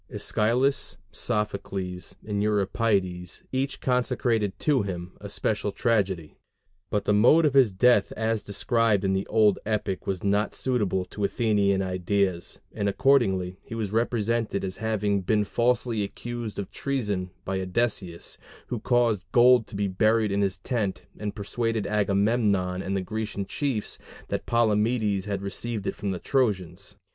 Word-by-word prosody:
Æschylus, 120 0 +1
Sophocles, 100 -4 -3
and 105 -1 -1
Euripides 100 -4 0
each 135 +2 -1
consecrated 120 -5 0
to 145 -5 +2
him 90 -2 -5
a 100 - -7
special 105 0 -1
tragedy; 95 -9 0 0.5
but 105 - -1
the 105 - +3
mode 125 +10 +6
of 145 - +2
his 130 -6 +5
death 105 +2 +4
as 110 -1 -1
described 110 0 +1
in 95 - +2
the 95 +1 -1
old 105 -3 +3
epic 105 -3 -2
was 95 -2 -2
not 100 +1 +1
suitable 105 -8 0
to 100 +3 -6
Athenian 100 -2 +2
ideas, 95 -1 -1
and 100 -1 0
accordingly 95 -7 +2
he 115 - -8
was 110 -4 -3
represented 115 -2 0
as 95 -1 -4
having 105 -2 0
been 105 +3 +2
falsely 120 -1 +1
accused 120 +2 -5
of 100 - -5
treason 105 -10 -2 0.2
by 95 0 -1
Odysseus, 95 -3 -2 0.3
who - - -2
caused 120 -6 +2
gold 120 -1 +6
to - - -10
be 100 0 0
buried 110 +2 +2
in 100 +1 +1
his 95 -3 0
tent, 100 0 -2 0.2
and 105 -1 -4
persuaded 115 +1 -2
Agamemnon 100 -2 +1
and 95 +1 -2
the - - -1
Grecian 105 0 -4
chiefs 130 -3 -2 0.3
that - - -3
Palamedes 110 -3 +2
had 100 -1 -3
received 105 +1 -3
it - - -1
from 100 - -4
the 95 - -1
Trojans. 105 - -1
105 Hz, 150 wpm, -26 LUFS, 95-115 Hz, 0.5 s, mode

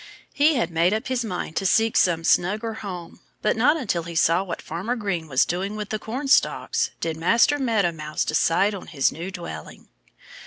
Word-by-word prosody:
He 300 +2 +3
had 205 -9 0
made 170 +5 +2
up 220 - -4
his 255 -2 0
mind 180 -6 -5
to 195 - -1
seek 225 +3 +2
some 165 -2 +3
snugger 210 +7 +1
home. 180 -4 -7 0.2
But 210 - +2
not 270 +8 +3
until 200 - -1
he 170 0 -8
saw 165 +2 +3
what 180 -3 -5
Farmer 190 +10 -4
Green 195 -8 -3
was 130 -3 +3
doing 190 +4 -3
with 210 -1 -5
the 215 - -2
cornstalks 265 +6 +1
did 160 -1 -3
Master 230 - +3
Meadow 220 -9 +1
Mouse 155 -2 -3
decide 195 +5 +2
on 195 - -8
his 140 -5 +1
new 170 +4 -6
dwelling. 170 - -9
190 Hz, 190 wpm, -24 LUFS, 170-225 Hz, 0.2 s, He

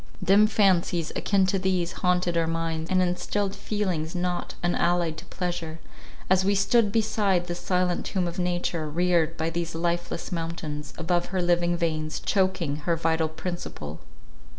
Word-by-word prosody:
Dim 200 +3 +6
fancies, 185 -5 +2
akin 195 -2 +2
to 190 +1 +1
these, 185 -2 0
haunted 180 -2 +1
our 165 -1 +2
minds, 165 0 -2
and 185 -1 +3
instilled 195 +2 -1
feelings 185 -6 -2
not 180 0 -2
unallied 175 -1 +1
to - - -9
pleasure, 175 -3 -4 0.5
as 190 0 +4
we 200 +1 +2
stood 210 +2 +3
beside 210 -5 +1
this 175 0 -4
silent 180 0 0
tomb 185 -2 -1
of 175 +2 -5
nature, 175 -3 -1
reared 165 0 +1
by 160 +1 -1
these 170 0 -3
lifeless 175 +1 -2
mountains, 165 -3 -4
above 175 +1 0
her 190 - -2
living 175 0 +2
veins, 155 -2 -1
choking 185 -7 0
her 165 +3 0
vital 160 -1 +1
principle. 160 - -6
175 Hz, 150 wpm, -26 LUFS, 165-185 Hz, 0.5 s, Dim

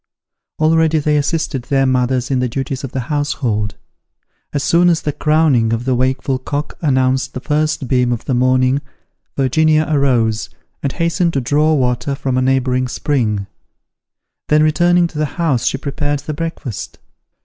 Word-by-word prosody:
Already 160 0 +3
they 150 0 +1
assisted 145 -3 -1
their 135 0 +2
mothers 130 0 0
in 130 - +1
the 125 -1 0
duties 135 +2 -4
of 135 - -5
the 130 - -2
household. 125 -6 -2 0.8
As 145 -1 -2
soon 175 +5 +4
as 165 -2 +1
the 150 - 0
crowing 150 -8 +2
of 115 +2 -2
the 130 - +1
wakeful 130 +1 0
cock 145 +3 -4
announced 130 -3 +1
the - - -2
first 150 0 -1
beam 125 -1 +2
of 120 - -3
the 130 - -1
morning, 130 +2 +2 0.6
Virginia 155 +3 +3
arose, 125 -7 +1 0.3
and 140 - -1
hastened 170 0 0
to 135 - +1
draw 150 +5 +2
water 130 +1 0
from 135 -2 -2
a 130 - +2
neighbouring 130 -1 +1
spring: 115 -6 -1 1.0
then 150 0 +4
returning 175 +3 +3
to 160 -3 -5
the 155 - +2
house 155 -9 +1
she - - 0
prepared 145 +1 -2
the 155 +1 -5
breakfast. 155 - -5
135 Hz, 160 wpm, -17 LUFS, 130-155 Hz, 1.0 s, soon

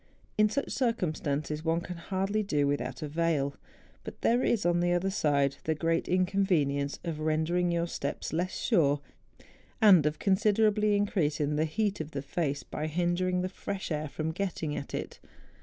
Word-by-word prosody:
In 215 0 +4
such 280 +6 -2
circumstances 155 - -1
one 165 +1 +1
can 175 0 -7
hardly 195 +4 -1
do 150 -8 +1
without 130 -1 -2
a - - -2
veil; 150 -3 0 0.5
but - - -9
there 240 +2 +3
is, 230 -6 +1
on 175 0 +3
the 175 0 +2
other 185 +2 +1
side, 140 -6 +1
the 160 - +1
great 165 +1 0
inconvenience 180 -7 +1
of 165 -3 -4
rendering 160 +3 +1
your 170 0 +1
steps 170 - -4
less 180 +3 -1
sure, 145 -4 +2 0.8
and 185 -9 +7
of 150 - -1
considerably 210 +1 +3
increasing 155 -8 0
the 155 +1 +2
heat 200 +3 -1
of 155 0 -7
the 140 -1 -3
face, 145 -1 -2
by 155 - -4
hindering 175 +2 0
the - - 0
fresh 195 0 -5
air 155 -1 -2
from 155 +2 -3
getting 165 -4 -3
at 140 - -5
it. - - -5
170 Hz, 170 wpm, -29 LUFS, 150-195 Hz, 0.8 s, and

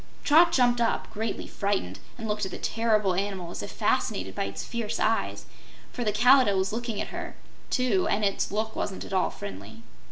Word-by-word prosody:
Trot 330 +3 +6
jumped 245 -3 +3
up, 230 - +1
greatly 220 +1 -3
frightened, 195 - -2 0.2
and 225 -2 -5
looked 210 0 -1
at 190 - -1
the - - -6
terrible 215 -4 +1
animal 190 -2 -3
as - - -5
if 100 - -6
fascinated 95 0 0
by 100 - -2
its 100 0 -5
fierce 230 -3 -3
eyes, 225 +1 0 0.5
for 245 - -3
the 210 - +1
Kalidah 245 -1 +5
was 190 +2 0
looking 230 -2 -3
at - - -3
her, - - -6 0.3
too, 245 -8 +2
and 210 +1 +1
its 195 - 0
look 220 +2 -2
wasn't 195 - -3
at - - -8
all 185 -1 +2
friendly. 100 +3 -9
210 Hz, 195 wpm, -27 LUFS, 185-230 Hz, 0.5 s, Trot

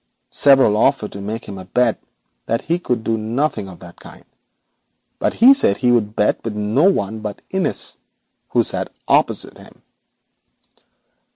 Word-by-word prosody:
Several 135 -7 +4
offered 105 -1 +1
to 100 -1 -7
bet 125 0 +2 0.5
that 115 - -1
he 170 +2 -1
could 125 -9 -2
do 115 0 -1
nothing 115 -1 -2
of 90 - -12
the 90 -1 -12
kind, - - -15 0.9
but - - -1
he 255 +4 +7
said 100 - +2
he 125 -1 +2
would 110 -3 +1
bet 105 - +1
with 115 -2 -4
no 110 - +2
one 110 - -2
but 105 -2 -7
Innis, 190 -1 -1 0.5
who - - +2
sat - - -1 0.2
opposite - - +1
him. - - -17
110 Hz, 145 wpm, -19 LUFS, 105-135 Hz, 0.9 s, he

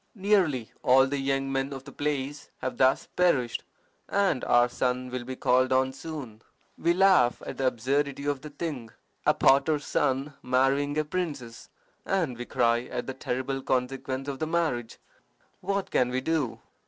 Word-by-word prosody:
Nearly 185 - +1
all 130 +1 +5
the 140 +1 -2
young 135 0 -1
men 135 +1 -1
of 135 -1 -7
the - - -11
place 145 -1 -3
have 130 - -4
thus 130 0 +3
perished, 140 -10 +2 0.5
and 195 -9 +1
our 120 0 +5
son 125 +1 -2
will 125 -1 -3
be 130 +1 -6
called 130 +1 +2
on 130 0 +2
soon. 135 -10 -8 0.3
We 170 +1 +1
laugh 185 -10 +4
at - - -6
the 135 - +2
absurdity 140 +4 -1
of 145 -2 -1
the 150 - -8
thing 145 -6 -5 0.4
a - - +5
potter's 140 +2 +3
son 135 +3 0
marrying 135 +3 +1
a 155 - +1
princess, 150 -9 -5 0.3
and 170 -10 0
we 120 +1 -6
cry 120 -1 +1
at 125 -1 -4
the 130 - -4
terrible 130 +1 -3
consequence 130 +1 -2
of 135 -2 -4
the 155 - -1
marriage. 155 -9 -1 0.6
What 195 +1 -2
can 125 - +2
we 125 +1 0
do?" 145 -4 -1
135 Hz, 165 wpm, -27 LUFS, 125-150 Hz, 0.6 s, all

